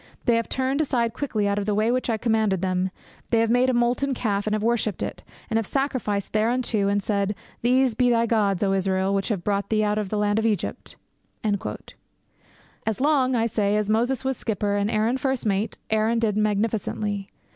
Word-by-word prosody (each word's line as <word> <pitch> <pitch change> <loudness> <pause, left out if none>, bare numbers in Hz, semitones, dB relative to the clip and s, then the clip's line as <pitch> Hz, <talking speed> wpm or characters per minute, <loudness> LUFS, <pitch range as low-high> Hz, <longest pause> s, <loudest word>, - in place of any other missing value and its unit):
They 240 - +4
have 230 0 -1
turned 265 +3 0
aside 235 -6 0
quickly 235 -6 -1
out 200 0 +1
of 200 - -4
the 210 - +1
way 215 +3 +2
which 255 0 -1
I 225 - +1
commanded 220 -5 +1
them; 185 0 0 0.4
they 230 - +3
have 230 0 +1
made 250 +2 +3
a - - +2
molten 245 +3 +1
calf, 205 -3 -1
and 215 - +1
have 215 - -2
worshipped 225 -4 0
it, - - -5 0.3
and 225 - 0
have 220 - -3
sacrificed 255 -8 -1
thereunto, 220 -1 +1
and 200 0 +1
said, 200 0 0 0.3
These 255 +1 +3
be 245 +3 +2
thy 230 -1 +3
gods, 210 -4 +1
O 195 -1 +2
Israel, 190 0 +1
which 195 0 0
have 200 -7 -2
brought 200 0 -1
thee 215 -1 +2
up 210 - +1
out 210 - -1
of 205 -3 -3
the 215 - -1
land 205 +1 +2
of 225 - -1
Egypt!' 205 -6 -3 1.9
As 220 -2 -2
long, 265 -2 +2
I 230 -1 +2
say, 210 -2 +1
as 210 0 0
Moses 240 +4 +1
was 265 -2 0
skipper 205 -2 -1
and 205 +1 0
Aaron 225 +4 +1
first 265 -2 -1
mate, 205 +1 0
Aaron 220 +2 +2
did 225 -3 +1
magnificently. 210 -1 -1
220 Hz, 210 wpm, -24 LUFS, 205-240 Hz, 1.9 s, They